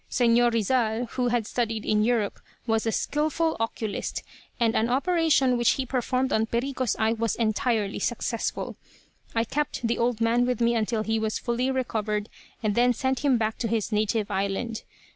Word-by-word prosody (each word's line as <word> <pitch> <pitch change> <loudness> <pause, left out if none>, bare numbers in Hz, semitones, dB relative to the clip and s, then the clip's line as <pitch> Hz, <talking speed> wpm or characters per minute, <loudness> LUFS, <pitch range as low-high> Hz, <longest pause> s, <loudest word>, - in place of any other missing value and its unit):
Señor 240 -1 +4
Rizal, 230 +1 +1
who 250 -1 0
had 240 -2 +1
studied 225 -2 -2
in 210 0 +2
Europe, 225 -3 0 0.3
was 225 -1 0
a - - +2
skillful 310 +5 0
oculist, 225 -2 -3 0.4
and 230 -2 +2
an 225 +2 +2
operation 280 -3 +2
which 240 - +4
he 265 - -2
performed 255 +1 0
on 220 +1 +2
Perico's 250 -1 -1
eye 220 0 +2
was 230 -2 -1
entirely 220 -2 0
successful. 235 -1 -2 0.6
I 225 - +3
kept 280 0 -2
the 235 - -1
old 235 -1 +1
man 235 +2 +2
with 250 -3 0
me 235 0 +3
until 220 -1 0
he 225 0 0
was 220 0 -1
fully 245 +2 -1
recovered, 220 -5 -1 0.3
and 215 -1 +1
then 245 +3 +4
sent 260 +2 -1
him 275 -4 +3
back 220 -1 -1
to 235 - -1
his 225 0 -1
native 215 0 0
island. 200 +4 -2
235 Hz, 175 wpm, -26 LUFS, 220-250 Hz, 0.6 s, Señor